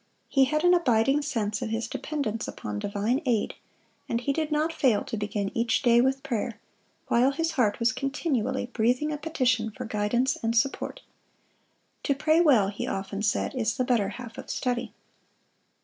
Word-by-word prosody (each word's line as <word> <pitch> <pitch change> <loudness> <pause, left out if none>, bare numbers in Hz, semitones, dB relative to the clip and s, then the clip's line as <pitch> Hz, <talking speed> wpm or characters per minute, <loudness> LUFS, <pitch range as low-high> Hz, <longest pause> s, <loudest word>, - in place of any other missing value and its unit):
He 270 -2 +4
had 305 +4 0
an 355 0 +6
abiding 270 -4 +3
sense 220 -8 -2
of 225 - -2
his 225 +1 -2
dependence 255 -8 -3
upon 105 -1 -5
divine 210 - -1
aid, 240 -6 0 0.6
and 230 - 0
he 280 +3 -1
did 310 0 -2
not 305 +2 +1
fail 245 -10 +2
to 255 - -5
begin 205 -1 -3
each 230 +3 +1
day 240 -1 +5
with 265 +1 +1
prayer, 230 -2 -3 0.5
while 245 +3 +4
his 325 +4 -1
heart 235 -9 +1
was 230 +1 +3
continually 265 -2 -1
breathing 250 +5 0
a 300 - -2
petition 255 -7 +1
for 250 +4 -7
guidance 225 +4 0
and 230 +1 0
support. 270 +4 0 1.0
"To 280 - +1
pray 310 +4 +3
well," 245 - +5
he 200 - -4
often 195 +1 -3
said, 210 0 0
"is 230 -3 -1
the 255 - +2
better 230 -6 +2
half 230 +2 -8
of - - -9
study." 245 -3 -2
245 Hz, 175 wpm, -27 LUFS, 220-275 Hz, 1.0 s, an